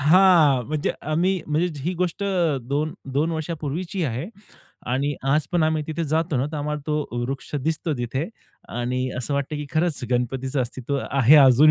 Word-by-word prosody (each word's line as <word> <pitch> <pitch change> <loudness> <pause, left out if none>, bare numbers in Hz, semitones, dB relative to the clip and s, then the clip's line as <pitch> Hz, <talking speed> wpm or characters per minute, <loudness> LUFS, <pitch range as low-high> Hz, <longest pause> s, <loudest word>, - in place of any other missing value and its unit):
हां. 155 -4 +6
म्हणजे 155 -1 0 0.2
आम्ही 180 +3 +2
म्हणजे 155 +4 +1
ही 175 +4 -1
गोष्ट 180 +2 -1 0.5
2-2 145 +1 -1
वर्षांपूर्वीची 165 +3 -3
आहे. 130 +5 -2 0.6
आणि 140 +4 0
आज 150 +1 +2
पण 175 -2 +3
आम्ही 155 -1 +1
तिथे 160 +1 -2
जातो 160 0 0
ना, 130 - +1
तर 155 0 -5
आम्हाला 150 0 -2
तो 150 -1 0 0.2
वृक्ष 135 +3 -5
दिसतो 160 0 -1
तिथे, 130 - -2 0.4
आणि 125 +2 -2
असं 130 +3 -2
वाटतं, 140 +2 -2
की 150 -1 -5
खरंच 160 -1 0
गणपतीचं 130 +2 0
अस्तित्व 130 +3 -2
आहे 135 +2 +6
अजून 140 +2 +7
150 Hz, 160 wpm, -24 LUFS, 135-160 Hz, 0.6 s, अजून